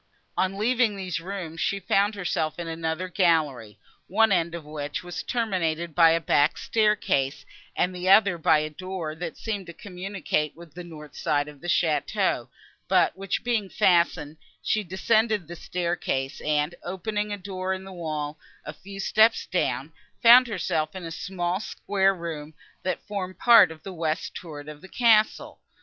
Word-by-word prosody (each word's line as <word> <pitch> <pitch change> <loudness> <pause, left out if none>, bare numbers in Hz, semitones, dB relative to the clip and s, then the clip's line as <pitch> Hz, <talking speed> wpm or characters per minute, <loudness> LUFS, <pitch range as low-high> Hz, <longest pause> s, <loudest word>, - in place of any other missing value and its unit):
On 190 +1 0
leaving 230 0 +2
these 185 -4 -3
rooms, 170 -2 -6
she 200 - 0
found 200 +2 +1
herself 165 -5 -2
in 175 -1 -5
another 165 +2 -3
gallery, 155 - +1 0.3
one 220 +3 +3
end 170 -2 +1
of 165 -3 -8
which 150 0 -5
was 175 0 -5
terminated 170 -8 -1
by 165 0 +6
a 165 +1 +3
back 150 -1 +2
staircase, 210 -11 +1 0.3
and 180 - +1
the 180 +1 -2
other 195 -3 +5
by 155 - +4
a 155 0 -1
door, 185 -1 -5
that 165 +1 -6
seemed 205 -5 -4
to 170 - -8
communicate 180 -5 -3
with 170 -2 -14
the 180 - -8
north 150 -4 -11
side 145 -1 0
of 150 -2 -12
the 175 - -7
château, 160 -4 +1 0.4
but - - +3
which 195 0 -3
being 225 -5 0
fastened, 170 -5 +2 0.3
she 215 - +1
descended 210 +1 +1
the 175 - -7
staircase, 170 -6 -2
and, 150 +2 +1
opening 210 +4 -3
a 205 - -2
door 185 -1 -4
in 190 0 -3
the 190 0 -10
wall, 155 -3 -4 0.3
a 150 - -6
few 195 +5 -11
steps 220 +3 +3
down, - - -1 0.3
found 245 +2 +8
herself 165 -6 -2
in 185 - -6
a 165 - -6
small 180 +1 -2
square 195 -2 0
room, 160 -3 -6 0.3
that 185 - -3
formed 185 -3 -4
part 230 -6 +7
of 160 -1 -11
the 195 - -7
west 160 -1 -2
turret 150 -4 -8
of 150 -1 -9
the 190 - -13
castle. 220 -3 +2
175 Hz, 170 wpm, -26 LUFS, 160-195 Hz, 0.4 s, found